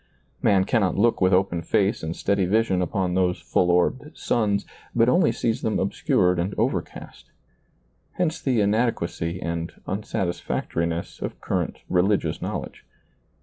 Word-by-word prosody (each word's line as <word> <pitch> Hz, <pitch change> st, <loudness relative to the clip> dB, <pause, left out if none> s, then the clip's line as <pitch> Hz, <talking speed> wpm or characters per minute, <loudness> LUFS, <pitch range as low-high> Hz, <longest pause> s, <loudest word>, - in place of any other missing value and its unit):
Man 95 Hz, -2 st, +4 dB
cannot 100 Hz, -4 st, +1 dB
look 115 Hz, +2 st, +2 dB
with 95 Hz, 0 st, +4 dB
open 90 Hz, -2 st, +2 dB
face 100 Hz, +5 st, +1 dB
and 80 Hz, +1 st, -4 dB
steady 100 Hz, -2 st, +1 dB
vision 100 Hz, -2 st, +2 dB
upon 90 Hz, 0 st, -1 dB
those 90 Hz, -1 st, +1 dB
full 90 Hz, -, +1 dB
orbed 90 Hz, -, +1 dB
suns, 100 Hz, -3 st, 0 dB, 0.3 s
but 115 Hz, 0 st, +4 dB
only 170 Hz, +6 st, +4 dB
sees 115 Hz, 0 st, -1 dB
them 110 Hz, -, 0 dB
obscured 90 Hz, -2 st, +1 dB
and 90 Hz, +4 st, -2 dB
overcast: -, -, -3 dB, 0.8 s
hence 170 Hz, -3 st, -1 dB
the 125 Hz, -5 st, +1 dB
inadequacy 100 Hz, -6 st, 0 dB
and 85 Hz, -1 st, -3 dB
unsatisfac 95 Hz, -2 st, -3 dB
toriness 85 Hz, 0 st, -2 dB
of -, -, -5 dB
current -, -, -2 dB
religious 95 Hz, +3 st, +1 dB
knowledge. -, -, -5 dB
95 Hz, 140 wpm, -24 LUFS, 90-110 Hz, 0.8 s, Man